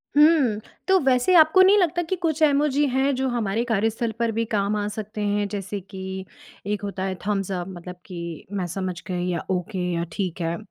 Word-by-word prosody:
हुँ। 295 -8 +5 0.3
तो 380 -1 +5
वैसे 260 +6 +3
आपको 320 +3 +7
नहीं 385 +2 +7
लगता 350 -3 +2
कि 345 +2 -2
कुछ 325 -3 -1
इमोजी 290 -1 +3
हैं 265 +2 +2
जो 265 +1 0
हमारे 230 -2 0
कार्यस्थल 225 +1 0
पर 230 -1 +1
भी 230 +1 -1
काम 200 0 +1
आ 205 0 -1
सकते 210 0 -5
हैं, 205 0 0
जैसे 200 0 -4
कि 190 0 -7 0.4
एक 210 0 -1
होता 195 -2 -4
है 190 -1 -2
थम्स 195 -2 -1
अप, 180 -1 -3
मतलब 180 -1 -8
कि 170 -3 -7
मैं 185 - -1
समझ 185 0 -4
गई 180 -1 -2
या 170 -2 -2
ओके 185 +2 -2
या 170 0 -1
ठीक 180 -1 -3
है। 165 0 -1
210 Hz, 200 wpm, -24 LUFS, 190-265 Hz, 0.4 s, आपको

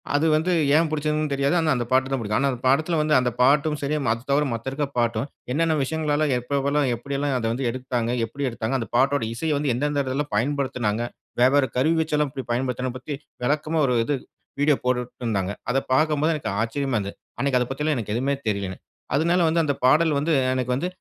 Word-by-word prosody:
அது 145 - +2
வந்து 160 +4 +2 0.2
ஏன் 160 +1 +4
புடிச்சதுனு 155 -1 -1
தெரியாது. 140 +5 +1
ஆனா 160 -2 +2
அந்த 120 -2 -1
பாட்டு 130 +1 +3
தான் 135 - 0
பிடிக்கும். 105 -1 -1
ஆனா 140 0 +2
அந்த 125 - -5
படத்தில 155 +5 +2
வந்து, 150 0 +1
அந்த 125 -1 0
பாட்டும் 150 +3 +3
சரி, 145 +2 -1 0.2
அது 115 0 -2
தவிர 145 +2 +3
மத்த 115 +3 -4
இருக்க 145 +1 -1
பாட்டும், 115 0 +1 0.3
என்னென்ன 160 +3 +2
விஷயங்கள்லலாம் 150 0 0
எப்பெல்லாம் 140 +2 0
எப்டியெல்லா 140 +3 -3
அதை 115 - -1
வந்து 130 +1 -3
எடுத்தாங்க, 125 -2 -2
எப்டி 140 +4 -4
எடுத்தாங்க, 115 +2 -3
அந்த 115 - -4
பாட்டோட 135 -1 +2
இசைய 160 +6 -2
வந்து 145 -3 0
எந்தெந்த 145 +3 0
இடத்லலா 135 +3 -2
பயன்படுத்தினாங்க. 125 -3 0 0.4
வேவ்வேற 135 +2 +5
கருவி 160 +5 +3
வச்செல்லாம் 150 -2 0
எப்டி 135 -3 -5
பயன்படுத்தணும் 125 0 -2
பத்தி, 140 +3 -5 0.3
விளக்கமா 155 +3 0
ஒரு 125 - +1
இது 145 +4 0 0.5
வீடியோ 145 0 +4
போட்டுருந்தாங்க 120 -6 -1 0.2
அதை 135 - +2
பார்க்கும்போது 155 +2 +2
எனக்கு 140 - -3
ஆச்சரியமா 135 +2 -1
இருந்தது. 100 -1 -4 0.2
அன்னைக்கு 135 -2 +2
அதை 125 - +1
பத்தி 135 - -5
எல்லாம் 155 -2 +1
எனக்கு 105 -2 -3
எதுவுமே 140 +3 0
தெரியல. 100 -2 -2 0.4
அதனால 170 +4 +2
வந்து, 165 +1 +2
அந்த 145 - 0
பாடல் 150 +2 +4
வந்து, 160 +3 0 0.2
எனக்கு 125 -1 -1
வந்து, 160 +8 -1
140 Hz, 195 wpm, -24 LUFS, 125-150 Hz, 0.5 s, வேவ்வேற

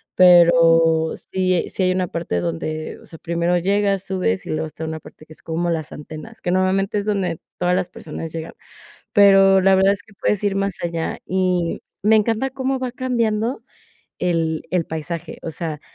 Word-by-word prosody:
pero 165 -2 +5
sí 185 -2 -1
sí 190 - -2
hay 185 - +3
una 185 0 0
parte 165 - -3
donde, 85 - -4
o - - -16
sea, 160 - -12
primero 170 +1 0
llegas, 195 +1 +1
subes, 180 - -1
y - - -9
luego 155 +1 -1
está 160 +1 -7
una 160 0 -5
parte 155 +1 -15
que 155 - -14
es - - -16
como 165 +1 -2
las 160 -2 -3
antenas, 155 +1 -10
que 175 - -2
normalmente 190 +2 +1
es 200 - -4
donde 190 -6 -1 0.2
todas 180 0 +1
las 185 -1 -1
personas 160 -1 -7
llegan. 165 0 -6 0.6
Pero 195 -2 +6
la 190 0 +5
verdad 195 +1 +4
es 200 - -8
que 220 - -20
puedes 210 +1 -1
ir 200 -1 +1
más 195 -2 -1
allá, 170 -1 -2
y 180 -2 0 0.2
me 215 +2 +5
encanta 225 +5 0
cómo 265 0 -2
va 255 -1 -3
cambiando 235 -2 -1 0.6
el 165 -3 0
el 180 -2 +1
paisaje, 160 +1 -6
o 165 - -4
sea, 155 -2 -5
180 Hz, 190 wpm, -21 LUFS, 165-195 Hz, 0.6 s, Pero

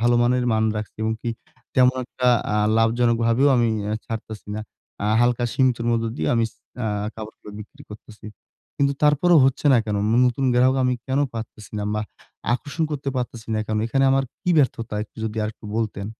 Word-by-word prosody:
ভালো 120 +1 +3
মানের 125 +1 +2
মান 110 0 +2
রাখছি 105 -1 -6
এবং 110 0 +1
কি 120 - -1 0.4
তেমন 130 0 +5
একটা 125 0 -3 0.3
আ - - +2 0.2
লাভজনক 115 +1 +3
ভাবেও 120 +5 +4
আমি 120 -1 +3 0.4
ছাড়তেছি 110 -2 -7
না। 110 - -3 0.4
আ - - +1
হালকা 120 0 +2
সীমিতর 125 -3 +1
মধ্যে 115 -1 0
দিয়ে 80 -1 -1
আমি 115 -1 +2 0.4
আ - - 0 0.3
কাপড়গুলো 110 -1 -10
বিক্রি 140 +7 -13
করতেছি। 105 0 -12 0.5
কিন্তু 140 0 +3
তারপরেও 150 +3 +5
হচ্ছে 135 +2 0
না 125 - +6
কেন? 105 -1 -2 0.3
নতুন 125 +2 -1
গ্রাহক 130 +2 +4
আমি 125 0 +2
কেন 135 0 0 0.2
পারতেছি 110 -1 -8
না 105 - -2
বা 105 - 0 0.5
আকর্ষণ 150 +5 -3
করতে 145 -2 -3
পারতেছি 120 -2 -4
না 110 - 0
কেন? 110 - -1
এখানে 135 +3 +1
আমার 135 0 +2 0.2
কী 180 - 0
ব্যর্থতা 120 -5 0
একটু - - -31
যদি 110 0 -4
আরেকটু 110 +1 -7
বলতেন? 105 -3 -2
120 Hz, 180 wpm, -23 LUFS, 110-130 Hz, 0.5 s, না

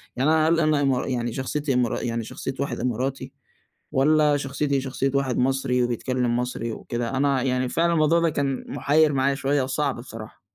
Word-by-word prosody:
يعني 135 +4 +1
أنا 160 0 +3
هل 165 0 +3
أنا 155 -2 +2
إما 135 -3 +1
يعني 120 -3 -2
شخصيتي 140 +2 -2
إمارا 125 -3 0
يعني 115 -1 -2
شخصيّة 135 +4 -5
واحد 140 - -2
إماراتي 130 +2 -2 0.6
والّا 150 +2 +3
شخصيتي 140 0 -1
شخصيّة 135 0 -2
واحد 135 -3 0
مصري 125 -1 +1
وبيتكلّم 120 0 -1
مصري 125 -1 -3
وكده، 120 +1 -4
أنا 140 -1 +2
يعني 125 -1 0
فعلًا 170 +4 +1
الموضوع 160 +1 +3
ده 170 0 +2
كان 140 -3 -2
مُحير 150 +1 +2
معايا 135 +1 +1
شويّة 140 +1 0
وصعب 135 +1 -1
بصراحة. 115 -3 -10
135 Hz, 175 wpm, -24 LUFS, 125-145 Hz, 0.6 s, أنا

